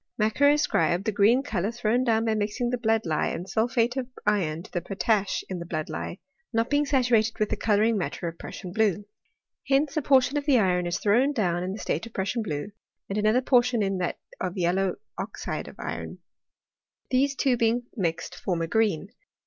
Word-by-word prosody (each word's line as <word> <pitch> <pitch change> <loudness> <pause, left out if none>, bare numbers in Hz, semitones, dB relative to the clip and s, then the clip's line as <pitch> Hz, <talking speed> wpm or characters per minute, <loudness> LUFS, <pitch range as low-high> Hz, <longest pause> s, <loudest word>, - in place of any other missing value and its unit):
Macquer 220 +7 +3
ascribed 185 - +2
the 220 - +1
green 220 +6 +4
colour 200 -7 -1
thrown 240 +1 +1
down, 225 -2 +2
by 220 - +2
mixing 215 +3 -1
the 250 - 0
blood 225 -1 +1
lie 155 -2 0
and 175 - -4
sulphate 230 +4 +1
of 260 -2 -2 0.2
iron 175 -6 +1
to - - -15
the 175 - -2
potash 200 +2 0
in 185 -2 -4
the 170 - -6
blood 155 -3 -3
lie» - - -5 0.3
not 230 +2 0
being 290 0 +2
saturated 240 -5 +2
with 215 - 0
the - - 0
colouring 215 0 +2
matter 180 -1 -3
of 165 0 -7
Prus - - -8
sian 180 -3 -7
blue. 210 -2 +1 0.6
Hence 280 +3 +2
a 310 - +1
portion 270 0 +3
of 290 0 -3
the 275 -3 +5
iron 180 -4 +2
is 175 - -1
thrown 245 +8 +3
down 175 -8 0
in 185 +1 -3
the 200 - -5
state 225 - -2
of 230 - -15
Prussian 200 +5 -1
blue, 155 -2 -4 0.4
and 200 +2 -1
another 215 +4 +3
por 250 -1 +5
,tion 240 -3 0
in 195 -1 -1
that 180 - -2 0.2
of 185 +1 -3
yellow 185 +2 +1 0.2
oxide - - -4
of - - -11
iron: - - -5 0.9
these 275 +2 +2
two 265 -1 +2
being 235 +1 +1
mixed 170 -7 -2
form 175 -3 -2
a - - -2
green. 200 -2 +1
215 Hz, 205 wpm, -26 LUFS, 185-245 Hz, 0.9 s, the